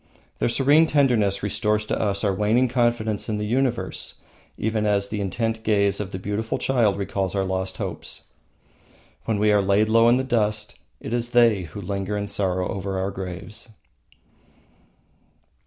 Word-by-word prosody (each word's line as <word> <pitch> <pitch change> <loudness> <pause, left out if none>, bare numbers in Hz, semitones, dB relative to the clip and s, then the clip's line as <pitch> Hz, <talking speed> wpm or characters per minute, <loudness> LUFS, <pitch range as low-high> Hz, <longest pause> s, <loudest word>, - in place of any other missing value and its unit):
Their - - +1
serene 145 +6 +4
tenderness 120 -11 +2
restores 105 +1 0
to - - -2
us 100 -1 0
our 100 -2 +2
waning 110 +6 +2
confidence 120 -4 0
in 105 - -1
the 105 - -2
universe 125 +1 -1 0.4
even 110 -1 -1
as 100 -1 +1
the 105 -1 -3
intent 115 +3 -2
gaze 100 -3 +1
of 100 -2 -4
a - - -2
beautiful 105 +4 -3
child 115 -7 +1
recalls 100 -1 -2
our 95 - +1
lost 95 0 -3
hopes. - - -6 1.0
When 110 -2 0
we 105 +1 +3
are 105 -1 +4
laid 100 +2 +2
low 115 +1 +5
in 120 - +4
the 130 - 0
dust 105 -4 0 0.3
it 110 - -6
is 120 0 0
they 115 -6 +4
who 85 +6 -8
linger 100 +1 -3
in 100 - -2
sorrow 95 -3 -1
over 95 0 -3
our 95 +1 -1
graves. 95 +4 -7
105 Hz, 165 wpm, -23 LUFS, 100-115 Hz, 1.0 s, low